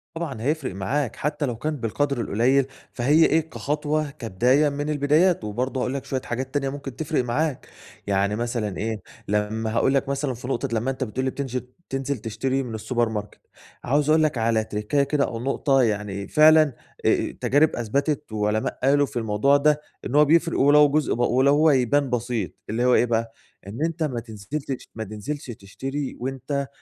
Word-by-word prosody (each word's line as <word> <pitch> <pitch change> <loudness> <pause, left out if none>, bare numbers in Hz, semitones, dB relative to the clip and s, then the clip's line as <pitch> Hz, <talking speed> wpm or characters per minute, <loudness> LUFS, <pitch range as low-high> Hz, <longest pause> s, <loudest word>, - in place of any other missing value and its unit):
طبعًا 155 -9 -4
هيفرِق 145 - -1
معاك، 120 +7 -1
حتى 150 0 -2
لو 120 -4 -2
كان 150 +6 -3
بالقدْر 135 +2 -1
القليل، 125 +6 +2 0.3
فهي 145 +6 +4
إيه 160 +1 +1
كخطوة، 150 +1 -1
كبداية 130 +2 +2
من 145 +1 -3
البدايات، 150 +2 +3
وبرضو 125 +5 -2
هاقول 125 +1 -1
لك 140 - -4
شوية 130 -1 -2
حاجات 130 +2 -4
تانية 140 -2 0
ممكن 135 -2 -7
تفرِق 150 -2 -1
معاك، 135 +3 -1 0.4
يعني 100 +1 +1
مثلًا 115 -4 -2
إيه، 110 -1 -3 0.3
لما 105 +2 -1
هاقول 135 +3 +3
لك 135 0 +1
مثلًا 140 -1 -1
في 125 +1 -8
نقطة 135 +1 -1
لما 115 +4 0
أنت 130 0 -3
بتقول 130 +2 -3
لي 130 - 0
بتنجل 130 -2 -4 0.2
تنزل 135 0 -2
تشتري 120 +5 -2
من 120 -3 -6
السوبر 120 +1 0
ماركت 105 -1 -6 0.4
عاوز 145 +4 +1
أقول 155 0 +5
لك 150 -5 +1
على 110 -1 +2
تِركَّاية 105 +7 0
كده 140 0 +1
أو 115 - -5
نقطة 135 +2 +2
يعني 105 -4 -1
فعلًا، 155 +3 +7 0.4
آآ، - - +5
التجارب 145 +3 +1
أثبتت 140 +5 -1
وعلماء 105 0 -1
قالوا 145 +1 +4
في 120 -2 -4
الموضوع 110 +6 +3
ده، 150 +1 +2 0.2
إن 130 - -3
هو 150 +1 +7
بيفرِق 165 +2 +2
ولو 145 +1 +6
جزء 150 0 +1
ب - - -4
ولو 130 +3 +3
هو 155 +1 +5
يبان 135 +1 +2
بسيط، 120 -4 -2 0.2
اللي 120 +4 0
هو 125 - +5
إيه - - +4
بقى؟ 115 -1 -1 0.3
إن 115 +10 -4
أنت 165 0 -2
ما 130 -6 -1
تنزلتش 120 +5 -6
ما 110 - -4
تنزلش 110 +8 -6
تشتري 135 +7 -5
وأنت 135 +2 -3
130 Hz, 185 wpm, -24 LUFS, 115-145 Hz, 0.4 s, فعلًا